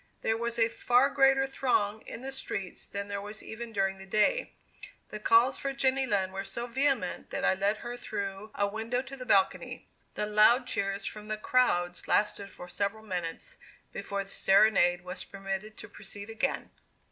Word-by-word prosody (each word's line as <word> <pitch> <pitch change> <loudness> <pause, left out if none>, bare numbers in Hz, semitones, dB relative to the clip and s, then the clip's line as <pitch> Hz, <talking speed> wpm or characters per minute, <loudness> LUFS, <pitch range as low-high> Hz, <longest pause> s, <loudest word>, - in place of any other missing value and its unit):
There 225 - +2
was 235 +1 -2
a 225 -1 +4
far 245 +4 +3
greater 270 0 +4
throng 220 -6 0
in 230 - -7
the 270 - -4
streets 200 -8 -5
than 200 0 -5
there 200 0 -3
was 210 +1 -8
even 230 +1 -7
during 195 -2 0
the 195 - -11
day. 215 - +2 0.6
The 215 - -6
calls 230 +5 +4
for 275 0 -2
Jenny 270 -1 +2
Lind 190 -4 0
were 195 0 -3
so 200 +5 -5
vehement 260 -4 0
that - - -2
I - - +5
led 200 +3 +1
her 240 0 -4
through 200 -3 -5
a 205 - +2
window 225 +4 -2
to 270 +1 -9
the 255 -2 -9
balcony. 195 -3 +1 0.3
The - - -1
loud 215 +4 +5
cheers 195 -2 -2
from 210 0 -6
the 215 0 -2
crowds 180 -7 +1
lasted 205 -1 +1
for 180 - -10
several 200 +4 -3
minutes, 180 - -4 0.4
before 200 0 -3
the 195 - -14
serenade 195 -3 +4
was 180 +1 -6
permitted 195 +2 -5
to - - -9
proceed 205 +2 -9
again. 225 - -2
215 Hz, 180 wpm, -30 LUFS, 195-245 Hz, 0.6 s, I